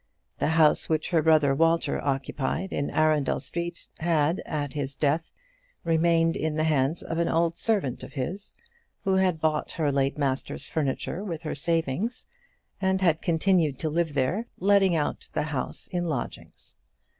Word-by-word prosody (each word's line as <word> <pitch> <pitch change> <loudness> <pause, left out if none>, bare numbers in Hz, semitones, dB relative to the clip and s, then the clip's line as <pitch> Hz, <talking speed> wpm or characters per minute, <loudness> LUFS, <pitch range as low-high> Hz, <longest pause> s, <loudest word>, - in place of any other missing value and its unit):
The - - +1
house 160 -1 +3
which 155 -1 0
her 165 -2 +4
brother 155 -3 +4
Walter 165 0 +2
occupied 140 +6 -2
in 140 - -1
Arundel 155 -3 +2
Street 170 0 -5
had, 160 0 +1
at 145 -3 -3
his 140 -2 -3
death, 155 +3 0 0.5
remained 165 0 +3
in 155 -1 -1
the 155 - +1
hands 155 0 +1
of 165 0 -3
an 170 - +2
old 165 0 +2
servant 195 - 0
of - - -10
his, 170 +9 -4 0.5
who 195 - +1
had 185 -4 +2
bought 155 -1 0
her 150 -3 0
late 135 0 0
master's 135 -2 -2
furniture 155 +5 -2
with 170 -5 -5
her 155 - -3
savings, 165 - -1 0.6
and 190 0 +2
had 165 -4 +3
continued 165 -4 +2
to 155 - -2
live 165 -2 0
there, 175 - 0
letting 195 -1 +4
out 150 -2 -2
the - - 0
house 145 -4 -4
in 175 -2 -1
lodgings. 145 -8 -5
160 Hz, 160 wpm, -27 LUFS, 145-170 Hz, 0.6 s, her